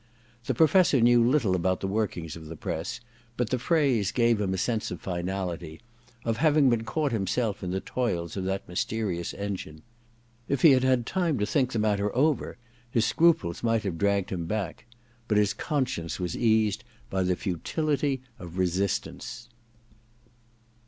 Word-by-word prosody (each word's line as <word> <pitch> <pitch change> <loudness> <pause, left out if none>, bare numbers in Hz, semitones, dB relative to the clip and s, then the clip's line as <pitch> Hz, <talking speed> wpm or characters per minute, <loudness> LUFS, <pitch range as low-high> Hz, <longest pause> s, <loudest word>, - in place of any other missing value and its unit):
The - - -1
Professor 160 -3 +5
knew 120 0 +5
little 120 -6 +3
about 95 +1 0
the 95 - -3
workings 95 -6 -2
of 80 -1 -10
the 80 - -7
press, 85 +10 -4 0.4
but 120 -3 -1
the 130 - +1
phrase 125 - +2
gave 115 -3 +2
him 95 -2 0
a 95 - -1
sense 110 +3 -1
of - - -6
finality, 90 -3 -4 0.5
of 115 -1 0
having 150 -3 +4
been 115 -1 0
caught 145 +5 -1
himself 105 0 -1
in 90 - -3
the 95 +1 -2
toils 90 -10 -2
of 95 - -3
that 95 +1 -2
mysterious 90 -1 -2
engine. 95 -6 -5 0.7
If 140 -2 0
he 160 - +9
had 130 -1 +4
had 130 -2 +2
time 170 -4 0
to 105 - +1
think 125 +5 +1
the - - -2
matter 105 -1 +1
over 145 +3 +1 0.3
his 115 -2 +2
scruples 155 - +2
might 115 -2 +1
have 90 -5 -3
dragged 100 -1 +1
him 85 -3 -3
back; 100 0 -4 0.4
but 105 - +2
his 105 -1 +3
con 145 -3 0
science 85 -10 -5
was 90 -3 -2
eased 110 -1 +2 0.3
oy 95 - +1
the 90 0 +1
futility 140 - -1 0.2
of 90 0 -9
resistance. 100 +6 -2
105 Hz, 170 wpm, -27 LUFS, 95-125 Hz, 0.7 s, he